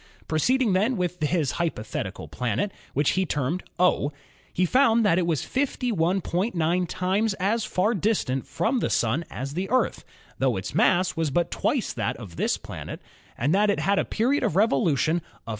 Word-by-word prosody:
Proceeding 230 - +2
then 215 +6 +2
with 180 -2 -2
his 155 -2 +1
hypothetical 130 - -3
planet, 125 - -2 0.2
which 145 +1 +3
he 190 - +1
termed 155 +1 -1 0.2
"O," 180 -5 +2 0.4
he 180 - +1
found 230 +1 +4
that 185 -3 +4
it 175 - 0
was 160 -5 0
51.9 185 - 0
times 195 +3 0
as 210 +4 0
far 210 +1 +1
distant 185 - 0
from 245 +3 0
the - - 0
Sun 125 +9 +1
as 135 +2 -5
the 185 +4 -3
Earth, 255 +2 +1 0.4
tho - - +2
its - - -5
mass 180 -3 +3
was 165 -2 0
but 170 +5 0
twice 260 -6 0
that 105 -4 -2
of 100 -8 -10
this - - 0
planet, - - -8 0.4
and 145 - +1
that 205 +2 +3
it 200 - +1
had 195 +6 +2
a - - +2
period 255 +6 0
of - - 0
revolution 160 - +2
of - - -3
373. - - -27
180 Hz, 175 wpm, -25 LUFS, 155-210 Hz, 0.4 s, found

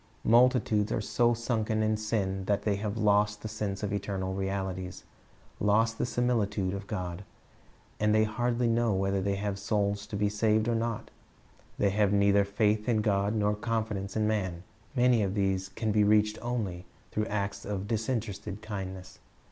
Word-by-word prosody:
Multitudes 115 -3 +4
are - - 0
so 120 +3 +2
sunken 110 -2 0
m 110 0 +2
sm 100 -3 -1
that 100 0 0
they 100 -2 +1
have 105 +1 -3
lost 105 -1 +2
the - - -3
sense 105 -2 -4
of 105 - -1
eternal 95 -2 -2
realities, 95 -1 -3 0.6
lost 110 +2 +2
the - - 0
similitude 105 -6 0
of 100 0 -6
God 90 -2 -4 0.8
and 105 0 +2
they 110 0 +4
hardly 120 +2 0
know 115 -2 +2
whether 95 0 0
they 100 +1 0
have 100 0 -3
souls 100 0 -1
to - - -6
be 105 0 +1
saved 110 +1 +1
or 120 - +2
not. 115 -1 -2 0.7
They 100 - +2
have 105 0 +2
neither 100 0 +4
faith 105 +2 +1
in 110 -2 +3
God 100 0 +1
nor 105 -1 +2
confidence 105 -3 -2
in 110 - +2
man. 95 -5 -1 0.3
Many 125 -2 +4
of 100 -1 -1
these 95 -1 0
can 110 +2 -2
be 105 0 +4
reached 105 +1 +3
only 105 -8 -3 0.3
through 110 +1 -1
acts 100 -1 -2
of 100 -1 -4
disinterested 110 -2 -3
kindness. 95 -3 -6
105 Hz, 170 wpm, -29 LUFS, 100-110 Hz, 0.8 s, Multitudes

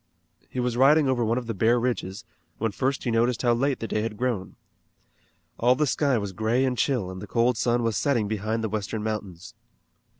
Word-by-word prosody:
He 130 - -5
was 125 -1 -1
riding 145 +3 +5
over 130 -2 +1
one 115 +2 +1
of 125 - -3
the 115 - -3
bare 115 +4 +3
ridges, 115 -3 -3 0.3
when 115 -1 -1
first 135 +6 -1
he 120 - -1
noticed 115 +1 +1
how 120 -1 +4
late 135 +3 0
the 115 - -4
day 105 - -1
had 110 -1 -4
grown. 120 -6 -2 1.0
All 125 +2 +4
the 150 +3 +1
sky 140 -1 +1
was 100 -3 -4
gray 110 +6 +1
and 130 -1 0
chill 120 -8 0
and 95 0 -8
the 105 - -7
cold 120 +3 +2
sun 120 +2 +1
was 115 -2 0
setting 120 -7 +1
behind 110 +2 -2
the 110 - -1
western 105 +1 -3
mountains. 100 -5 -5
115 Hz, 210 wpm, -25 LUFS, 110-125 Hz, 1.0 s, riding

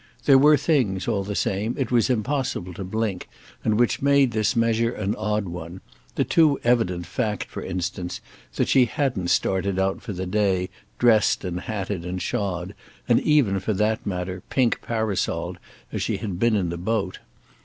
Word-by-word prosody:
There 135 -2 +7
were 150 +2 +6
things, 125 - +1
all 100 - 0
the 100 +1 -4
same, 105 +5 -1
it 130 -4 -2
was 120 -1 +3
impossible 125 -6 -1
to 95 - -6
blink 100 -1 -3 0.3
and 110 0 +1
which 120 - +2
made 140 -2 +4
this 110 0 +1
measure 115 0 +2
an 105 -3 -2
odd 105 -1 -1
one—the 85 -8 -6
too 155 -4 +3
evident 90 -8 +1
fact 105 +4 -2
for - - -8
instance 90 0 -4 0.4
that - - +1
she 130 -2 +5
hadn't 120 -7 -1
started 95 +1 +1
out 95 0 0
for 110 - -6
the 95 +1 -4
day 95 -1 0 0.3
dressed 115 -3 +3
and 90 -1 -3
hatted 100 -3 -4
and 90 +1 -4
shod, 95 -4 -2 0.3
and - - +4
even, 130 -11 +3
for 100 +3 -1
that 105 +2 0
matter, 90 -1 -4
pink 125 -4 +1
parasol'd, 110 -4 -2 0.3
as - - -3
she - - -1
had 95 -5 -5
been 115 0 +3
in 95 -4 0
the 85 - -4
boat. 100 +1 -2
105 Hz, 175 wpm, -24 LUFS, 95-115 Hz, 0.4 s, There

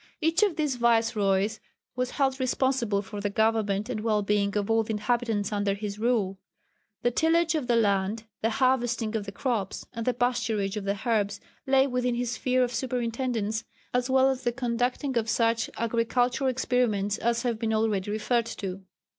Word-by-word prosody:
Each 325 +3 +2
of 405 -6 +3
these 295 -5 -1
viceroys 220 -3 +2 0.4
was 250 0 -1
held 270 -1 +1
responsible 255 -5 +1
for 205 +1 -7
the 205 - -1
government 215 -1 +1
and 250 -4 -3
well 215 -1 +1
being 200 0 +1
of 200 -1 -1
all 225 0 +3
the 220 - -7
inhabitants 220 -1 0
under 205 -1 0
his 205 0 -5
rule. 215 -5 0 0.6
The 240 - +3
tillage 330 +5 +2
of 300 -6 -1
the 240 - +3
land, 205 -1 +1 0.2
the 225 - +2
harvesting 240 -3 +1
of 205 -2 -2
the - - -4
crops, 215 -4 -2
and 230 -1 -4
the 250 - +2
pasturage 225 -5 0
of 210 -2 -4
the 200 0 0
herds 205 -2 0 0.3
lay 265 0 +5
within 250 -2 0
his 240 -1 -1
sphere 255 +1 +1
of 245 0 -2
superintendence, 235 -2 -2 0.3
as 250 +1 0
well 265 0 +4
as 260 -1 -4
the 240 - 0
conducting 245 +2 -1
of 220 0 -3
such 230 0 +1
agricultural 245 +3 +1
experiments 235 -5 0
as 235 0 0
have 235 -3 -1
been 225 -1 -1
already 215 -3 0
referred 230 +2 0
to. 195 -4 -5
230 Hz, 180 wpm, -27 LUFS, 210-250 Hz, 0.6 s, lay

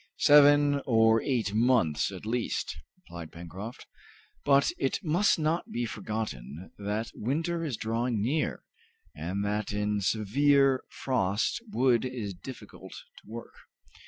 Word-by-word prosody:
"Seven 145 -1 +6
or 115 -2 +4
eight 115 -7 -1
months 110 - +2
at 95 +1 -9
least," 120 +2 -2 0.2
replied 85 -2 -10
Pencroft. 95 +7 -9 0.6
"But 140 0 +4
it 135 - 0
must 175 +6 +3
not 160 +2 -1
be 120 0 -2
forgotten 95 - -5
that 105 +2 -3
winter 165 +8 -2
is 140 -8 -3
drawing 115 +1 -1
near, 140 +9 -1 0.5
and 90 +6 -3
that 105 +1 -2
in 105 0 -1
severe 135 +7 +3
frost 110 - -1
wood 125 - +3
is 120 -6 -4
difficult 120 +9 -11 0.3
to - - -25
work. 115 +1 -8
115 Hz, 125 wpm, -28 LUFS, 105-135 Hz, 0.6 s, Seven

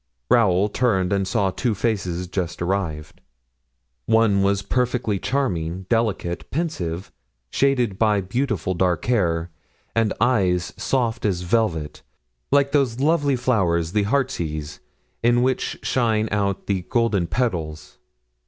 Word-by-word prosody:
Raoul 100 -4 +4
turned 100 -5 +1
and 95 -1 0
saw 95 -1 +1
two 115 +3 -1
faces 95 -5 -1
just 90 -2 -3
arrived. 85 -5 -3 0.9
One 110 -3 +4
was 100 0 +1
perfectly 125 -4 0
charming, 95 -10 -2
delicate, 105 -7 -1
pensive, 95 - -3 0.4
shaded 125 -8 +1
by 105 -3 +3
beautiful 100 - -1
dark 90 -2 0
hair, 90 -8 +1 0.4
and 115 -2 +2
eyes 95 -8 +2
soft 120 -4 -1
as 95 -4 0
velvet, 90 -6 -1 0.5
like 140 0 +3
those 135 -5 +1
lovely 145 -1 +2
flowers, 90 -10 +1
the 105 +1 +2
heartsease, 85 - -2 0.4
in 120 +1 +3
which 130 0 -1
shine 110 -4 +1
out 100 -2 -1
the 95 -2 0
golden 110 -4 0
petals. 85 -12 -3
100 Hz, 120 wpm, -22 LUFS, 90-120 Hz, 0.9 s, Raoul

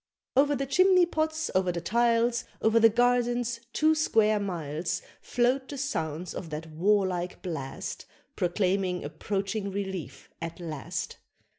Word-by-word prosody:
Over 285 +2 +4
the 275 +1 -1
chimney 365 +5 +5
pots, 315 -1 -1
over 185 -1 +2
the 170 - -3
tiles, 235 +4 +2
Over 220 +1 +4
the 225 0 +7
gardens, 240 0 +1
two 310 +4 +3
square 220 -9 +3
miles, 170 -2 -3 0.2
Float 255 +2 +1
the 285 - -6
sounds 170 - -3
of 170 - -6
that 155 +1 -6
warlike 185 +1 +1
blast, 150 -7 -5 0.3
Proclaiming 180 0 0
approaching 200 +6 -2
relief 190 -3 -5
at 165 +1 -5
last. 155 -8 -5
205 Hz, 130 wpm, -28 LUFS, 175-245 Hz, 0.3 s, the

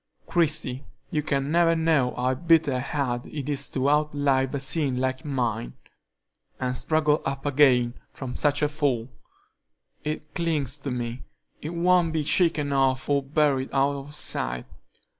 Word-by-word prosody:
Christie, 155 -6 +1 0.3
you 150 - 0
can 140 -1 -1
never 170 0 +4
know 160 -6 +2
how 125 +1 0
bitter 160 -3 +2
hard 125 -3 -2
it 145 -3 -6
is 140 -2 0
to 135 0 -1
outlive 145 -2 +1
a - - -1
sin 135 -1 0
like 130 0 -1
mine, 120 - -2 0.9
and 125 0 -1
struggle 155 +2 +1
up 135 +1 -4
again 130 -4 +4 0.2
from 130 -2 -7
such 145 0 +1
a - - +4
fall. 140 -6 -1 0.9
It 150 0 -5
clings 150 -5 -1
to 140 - -5
me; 120 0 -4 0.4
it 160 +3 -5
won't 175 -1 +3
be 155 -1 0
shaken 150 -3 +2
off 130 -1 +1
or 140 0 +3
buried 140 -1 +1
out 140 +1 +2
of 140 +1 -7
sight. - - -1
140 Hz, 150 wpm, -25 LUFS, 130-155 Hz, 0.9 s, never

